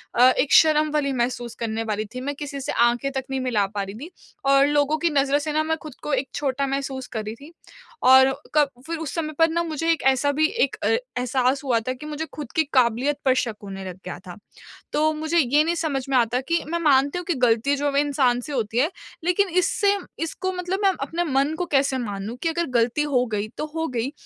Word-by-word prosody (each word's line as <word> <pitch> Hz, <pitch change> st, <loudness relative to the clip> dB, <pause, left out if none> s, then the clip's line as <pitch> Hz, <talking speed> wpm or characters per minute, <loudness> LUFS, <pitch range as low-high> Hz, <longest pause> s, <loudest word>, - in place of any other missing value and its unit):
अ, 250 Hz, +2 st, +7 dB
एक 275 Hz, +2 st, +1 dB
शर्म 310 Hz, -1 st, +5 dB
वाली 295 Hz, -2 st, 0 dB
महसूस 240 Hz, -1 st, -2 dB
करने 225 Hz, -1 st, -2 dB
वाली 215 Hz, -1 st, -2 dB
थी 255 Hz, -, -4 dB
मैं 285 Hz, +2 st, -3 dB
किसी 280 Hz, -1 st, -6 dB
से -, -, -3 dB
आँखें 240 Hz, +3 st, +2 dB
तक 265 Hz, -1 st, -3 dB
नहीं 265 Hz, -, -1 dB
मिला 230 Hz, -6 st, +1 dB
पा 200 Hz, -, -1 dB
रही 195 Hz, +2 st, -8 dB
थी, 300 Hz, +10 st, -9 dB, 0.3 s
और 275 Hz, 0 st, +5 dB
लोगों 290 Hz, +1 st, +2 dB
की 335 Hz, +1 st, +1 dB
नज़रों 280 Hz, 0 st, +2 dB
से 300 Hz, 0 st, -3 dB
ना 310 Hz, 0 st, +2 dB
मैं 320 Hz, 0 st, -1 dB
खुद 300 Hz, -4 st, -9 dB
को 295 Hz, -, -2 dB
एक 270 Hz, -, 0 dB
छोटा 275 Hz, -1 st, -1 dB
महसूस 270 Hz, -1 st, -3 dB
कर 220 Hz, -2 st, -4 dB
रही 215 Hz, +2 st, -5 dB
थी। 290 Hz, +7 st, -14 dB, 0.5 s
और 265 Hz, +1 st, +7 dB, 0.2 s
कब 295 Hz, -2 st, +4 dB, 0.2 s
फिर 330 Hz, 0 st, -3 dB
उस 315 Hz, -4 st, -5 dB
समय 310 Hz, -2 st, -2 dB
पर 325 Hz, 0 st, +5 dB
ना 340 Hz, +1 st, 0 dB
मुझे 325 Hz, 0 st, -1 dB
एक 325 Hz, -, 0 dB
ऐसा 285 Hz, +2 st, +1 dB
भी 310 Hz, +2 st, +2 dB
एक 465 Hz, +6 st, 0 dB
अ, -, -, +2 dB
एहसास 260 Hz, -, 0 dB
हुआ 245 Hz, -4 st, +2 dB
था 255 Hz, -, 0 dB
कि 260 Hz, +4 st, -11 dB
मुझे 305 Hz, +1 st, -4 dB
खुद 295 Hz, -5 st, -7 dB
की 320 Hz, -, +4 dB
काबिलियत 255 Hz, +3 st, +2 dB
पर 260 Hz, -, +5 dB
शक 225 Hz, -3 st, -4 dB
होने 195 Hz, -1 st, -7 dB
लग 185 Hz, -, -6 dB
गया -, -, -5 dB
था। -, -, -8 dB, 0.6 s
तो 310 Hz, +1 st, +2 dB
मुझे 315 Hz, +2 st, -1 dB
ये 290 Hz, +2 st, +4 dB
नहीं 340 Hz, +1 st, 0 dB
समझ 290 Hz, -6 st, -2 dB
में 265 Hz, -, +1 dB
आता 240 Hz, +1 st, +1 dB
कि 335 Hz, 0 st, +1 dB
मैं 340 Hz, +1 st, -1 dB
मानती 285 Hz, 0 st, +3 dB
हूँ 355 Hz, -, -5 dB
कि 345 Hz, -, +2 dB
गलती 235 Hz, +5 st, +2 dB
जो 285 Hz, 0 st, -1 dB
इंसान 275 Hz, -4 st, +2 dB
से 290 Hz, +4 st, -8 dB
होती 230 Hz, -2 st, -1 dB
है 300 Hz, +6 st, +3 dB, 0.3 s
लेकिन 360 Hz, +3 st, +2 dB
इससे 400 Hz, +3 st, +2 dB, 0.3 s
इसको 375 Hz, +3 st, -3 dB
मतलब 365 Hz, +2 st, -3 dB
मैं 390 Hz, -1 st, +4 dB
अपने 330 Hz, +5 st, -2 dB
मन 280 Hz, 0 st, +1 dB
को 355 Hz, -, 0 dB
कैसे 270 Hz, -1 st, +2 dB
मानूँ 210 Hz, 0 st, -5 dB
कि 330 Hz, -, +1 dB
अगर 340 Hz, +1 st, -1 dB
गलती 240 Hz, +6 st, +1 dB
हो 250 Hz, -3 st, +2 dB
गई 210 Hz, 0 st, -1 dB
तो 305 Hz, -, -2 dB
हो 325 Hz, 0 st, -1 dB
गई, 245 Hz, +2 st, -2 dB
280 Hz, 240 wpm, -23 LUFS, 250-315 Hz, 0.6 s, अ